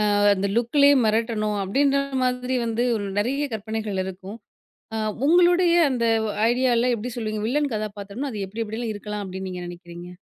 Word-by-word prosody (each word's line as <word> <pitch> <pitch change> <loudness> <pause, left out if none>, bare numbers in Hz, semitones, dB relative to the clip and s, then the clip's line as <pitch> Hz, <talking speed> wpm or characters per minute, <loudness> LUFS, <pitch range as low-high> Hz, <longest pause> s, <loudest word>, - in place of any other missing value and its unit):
ஆ - - +2 0.2
அந்த 195 +1 -1
லுக்குலயே 280 +4 +4
மிரட்டணும் 215 -1 0
அப்டின்ற 275 +8 +2 0.2
மாதிரி 250 0 0
வந்து 230 +2 0 0.3
நெறைய 275 +7 0
கற்பனைகள் 215 -2 -3
இருக்கும். 190 +3 -8 0.6
அ - - -1 0.3
உங்களுடைய 350 +1 +5 0.2
அந்த 240 -2 0 0.4
ஐடியால 245 -1 +2
எப்டி 240 +4 -5
சொல்லுவீங்க? 215 -2 -3
வில்லன் 285 +2 0
கதாபாத்திரம் 210 +5 -5
அது 210 -3 -4
எப்டி 220 +4 -4
எப்டிலாம் 220 +2 -4
இருக்கலாம் 210 0 -5
அப்டின்னு 190 0 -6
நீங்க 180 -1 -6
நெனைக்கிறீங்க? 175 0 -10
220 Hz, 145 wpm, -24 LUFS, 205-255 Hz, 0.6 s, உங்களுடைய